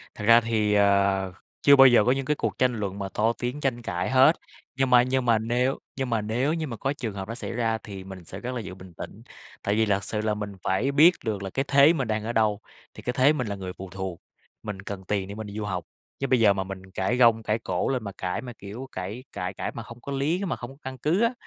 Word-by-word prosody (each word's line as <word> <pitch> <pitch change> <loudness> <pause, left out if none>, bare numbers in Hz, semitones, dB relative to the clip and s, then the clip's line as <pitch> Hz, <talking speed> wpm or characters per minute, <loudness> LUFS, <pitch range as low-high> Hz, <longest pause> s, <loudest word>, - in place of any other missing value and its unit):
thật 105 - -7
ra 115 +1 +7
thì, 110 -2 +1
ờ, 100 -2 +3 0.3
chưa 140 - +7
bao 135 -1 +9
giờ 120 -4 +6
có 125 - +4
những 135 0 0
cái 150 - +1
cuộc 110 -7 -2
tranh 125 -3 +1
luận 100 -1 -3
mà 100 -1 -3
to 110 +4 +1
tiếng 125 +4 -4
tranh 130 -4 -1
cãi 90 -6 -2
hết. 130 +5 +6 0.4
Nhưng 135 0 +1
mà 125 -1 +7
nhưng 130 0 0
mà 115 -2 +4
nếu 120 +4 0 0.2
nhưng 135 -1 -2
mà 115 -2 +1
nếu 120 +8 0
như 160 -2 -2
mà 115 -4 -6
có 135 +6 -1
trường 115 -7 -5
hợp 95 -1 -6
nó 115 - -5
xảy 120 - -5
ra 115 -1 0
thì 95 -3 -8
mình 95 -2 -10
sẽ - - -8
rất 125 +1 -4
là - - -2
giữ 95 -3 -8
bình 95 -1 -13
tĩnh. - - -9 0.4
Tại 100 - +1
vì 110 +1 +3
lật 100 -1 +1
sự 105 - -2
là 110 0 0
mình 105 -1 -5
phải 115 +9 +1
biết 155 +5 +7
được 105 -3 -2
là 95 - -4
cái 135 +8 -1
thế 140 +3 +6
mình 135 -7 -2
đang 110 -1 -1
ở 115 +2 -3
đâu. 105 -2 +2 0.3
Thì - - -11
cái 125 - -1
thế 135 +4 +4
mình 125 -7 -2
là 100 - -3
người 95 -2 -6
phụ 95 0 -8
thuộc, 95 -2 -5 0.4
mình 105 -3 -5
cần 100 -1 -7
tiền 95 0 -2
để 100 - -7
mà 110 - -5
đi 105 -1 -9
du 105 0 -4
học, 90 -4 -3 0.4
chứ 135 - -1
bây 130 -2 +3
giờ 105 -3 +6
mà 95 -1 -2
mình 95 0 -9
cãi 95 +7 0
gông 115 -2 +5
cãi 110 +1 0
cổ 90 -4 -1
lên 130 -4 -1
mà 100 - -5
cãi, 90 -1 -2
mà, 125 -2 -8
kiểu, 110 +5 -8
cãi 100 +7 -6
cãi - - -4
cãi - - -4
mà - - -6
hông 115 +1 -12
có 140 - -7
lý, 150 +8 0
mà 170 - -1
không 120 - -8
có 135 - -15
căn 130 0 -6
cứ 160 - +1
á, 235 +1 +3
110 Hz, 285 wpm, -26 LUFS, 100-130 Hz, 0.4 s, bao